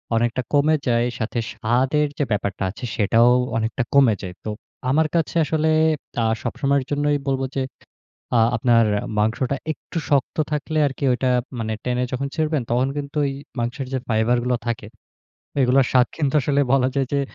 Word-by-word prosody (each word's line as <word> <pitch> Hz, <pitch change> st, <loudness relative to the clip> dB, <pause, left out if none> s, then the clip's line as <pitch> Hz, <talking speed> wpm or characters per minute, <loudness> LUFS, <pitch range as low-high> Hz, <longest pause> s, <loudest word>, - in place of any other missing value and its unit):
অনেকটা 120 Hz, +2 st, +1 dB
কমে 150 Hz, +2 st, +4 dB
যায়। 120 Hz, 0 st, +2 dB
সাথে 115 Hz, +1 st, -2 dB
স্বাদের 130 Hz, +6 st, +1 dB
যে 145 Hz, -, +3 dB
ব্যাপারটা 100 Hz, -2 st, -1 dB
আছে 125 Hz, -, -7 dB
সেটাও 115 Hz, +3 st, +4 dB, 0.3 s
অনেকটা 115 Hz, +3 st, -1 dB
কমে 135 Hz, -5 st, +6 dB
যায়। 90 Hz, -2 st, -6 dB
তো 110 Hz, -, -2 dB, 0.4 s
আমার 155 Hz, +4 st, +3 dB
কাছে 165 Hz, -1 st, 0 dB
আসলে 160 Hz, +1 st, 0 dB, 0.6 s
আ -, -, +1 dB, 0.2 s
সবসময়ের 140 Hz, +1 st, 0 dB
জন্যই 145 Hz, 0 st, +1 dB
বলব 135 Hz, -1 st, 0 dB
যে, 135 Hz, -, 0 dB, 0.8 s
আ -, -, +5 dB, 0.2 s
আপনার 115 Hz, 0 st, +4 dB, 0.4 s
মাংসটা 115 Hz, +5 st, 0 dB, 0.2 s
একটু 160 Hz, -, -8 dB
শক্ত 140 Hz, 0 st, +1 dB
থাকলে 150 Hz, +1 st, -2 dB
আরকি 135 Hz, +1 st, -6 dB
ঐটা 130 Hz, +1 st, 0 dB, 0.3 s
মানে 110 Hz, -1 st, -2 dB
টেনে 125 Hz, 0 st, 0 dB
যখন 135 Hz, +2 st, -2 dB
ছিড়বেন, 155 Hz, -3 st, 0 dB
তখন 125 Hz, +2 st, +2 dB
কিন্তু 145 Hz, +1 st, -5 dB
ওই 140 Hz, -, 0 dB, 0.3 s
মাংসের 125 Hz, +3 st, -3 dB
যে 130 Hz, -, 0 dB
ফাইবার 115 Hz, +2 st, +2 dB
গুলো 125 Hz, 0 st, +1 dB
থাকে, 115 Hz, -3 st, -3 dB, 0.7 s
এইগুলোর 130 Hz, 0 st, +4 dB
স্বাদ 125 Hz, -1 st, +5 dB
কিন্তু 145 Hz, -3 st, 0 dB
আসলে 140 Hz, +2 st, +1 dB
বলা 130 Hz, -1 st, +4 dB
যায় 135 Hz, -1 st, +1 dB
যে, 140 Hz, -, +2 dB
130 Hz, 165 wpm, -22 LUFS, 120-140 Hz, 0.8 s, কমে